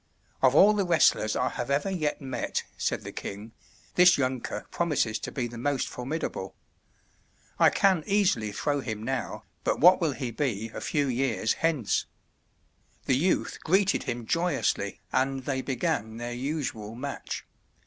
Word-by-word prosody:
"Of 130 0 +4
all 205 +6 +7
the 205 -1 +1
wrestlers 165 - +3
I - - +1
have 120 - -5
ever 145 +7 +1
yet 155 -5 -1
met," 130 -3 -3
said - - -2
the - - -6
king, 105 +3 -7 0.4
"this 180 0 +6
younker 130 -5 -2
promises 145 -10 0
to - - -6
be 125 - -2
the 120 0 -7
most 140 +1 0
formidable. 125 -7 -4 1.0
I - - +7
can 190 -5 +3
easily 190 - +2
throw 145 +7 -1
him 110 -5 -4
now, 130 -3 -3 0.2
but - - 0
what 180 +3 +7
will 160 -4 +1
he 130 -3 -4
be 115 -3 -2
a - - -6
few 145 -2 0
years 125 -3 +1
hence?" 155 -10 0 1.0
The 130 - +3
youth 175 +8 0
greeted 190 +4 +2
him 120 -1 -3
joyously, 170 +4 0
and 135 0 0
they 135 -2 -1
began 115 -4 -2
their 120 +1 -4
usual 125 -5 -3
match. 140 +3 -5
135 Hz, 155 wpm, -28 LUFS, 120-160 Hz, 1.0 s, all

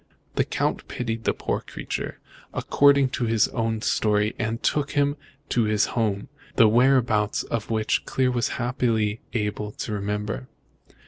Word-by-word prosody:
The - - +2
Count - - -1
pitied 115 -2 -4
the - - +3
poor - - -1
creature, - - -5 0.4
according 140 -2 +4
to 125 -1 -2
his 115 -1 +3
own 115 -2 -2
story, 105 0 +2
and 115 +1 -2
took 145 -1 0
him 145 0 +2 0.3
to 120 -2 +2
his 105 -1 +2
home, 105 -4 0 0.3
the 115 - +7
whereabouts 120 -3 +3
of 115 -3 -3
which 110 -1 +1
Clear 130 -1 +1
was 120 -2 +1
happily 115 -4 0
able 105 -1 -2
to 115 - -5
remember." 105 +4 -3
115 Hz, 145 wpm, -25 LUFS, 105-125 Hz, 0.4 s, the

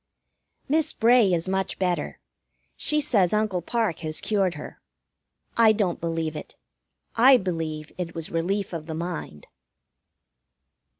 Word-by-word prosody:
Miss 310 +2 +1
Bray 235 -3 +4
is 170 0 0
much 190 0 -2
better. 180 -2 -2 0.6
She 300 - +1
says 205 -10 +2
Uncle 210 -4 0
Parke 220 -2 -1
has 155 -1 -2
cured 195 -5 0
her. 150 - -10 0.7
I 225 -2 +6
don't 200 -5 -1
believe 165 -2 -2
it. 150 - -8 0.6
I 255 +3 +7
believe 160 -6 -4
it 170 -2 -4
was 165 -1 -5
Relief 185 +4 -1
of 160 -2 -6
the 160 - -4
Mind. 165 - -6
180 Hz, 130 wpm, -25 LUFS, 165-215 Hz, 0.7 s, I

